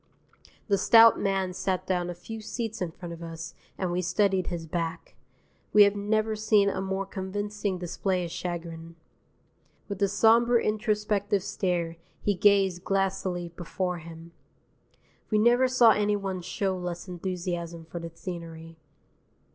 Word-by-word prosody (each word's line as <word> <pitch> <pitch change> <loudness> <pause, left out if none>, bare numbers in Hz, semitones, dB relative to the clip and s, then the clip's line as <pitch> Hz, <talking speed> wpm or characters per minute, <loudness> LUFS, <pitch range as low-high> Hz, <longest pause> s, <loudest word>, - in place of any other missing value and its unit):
The 200 -3 +2
stout 225 +2 +7
man 195 -2 0
sat 185 0 -2
down 180 -2 -1
a 175 - -5
few 220 +5 -8
seats 225 -1 -4
in 180 - -1
front 170 +1 -8
of 170 - -10
us 165 -1 -7 0.2
and 185 -2 -2
we 180 +1 0
studied 190 0 +1
his 170 -2 -4
back. 165 0 -4 0.6
We 210 - +9
have 200 0 +3
never 215 +2 0
seen 215 -2 +3
a 190 - -3
more 190 0 -2
convincing 200 +1 -3
display 180 +1 -2
of 170 - -7
chagrin. 165 -2 -6 0.9
With 200 -1 -6
a 200 - +4
sombre 230 +4 +4
introspective 210 -2 0
stare 175 -4 -2 0.2
he 205 - +1
gazed 195 -2 +3
glassily 190 -3 -1
before 180 +1 -3
him. 165 +1 -11 1.0
We 215 - +2
never 240 +4 +4
saw 250 -3 +6
any 210 0 +2
one 195 -2 -3
show 190 +2 -2
less 180 0 -5
enthusiasm 175 -2 -4
for 170 +1 -7
the 170 0 -6
scenery. 165 -1 -8
190 Hz, 145 wpm, -27 LUFS, 175-205 Hz, 1.0 s, We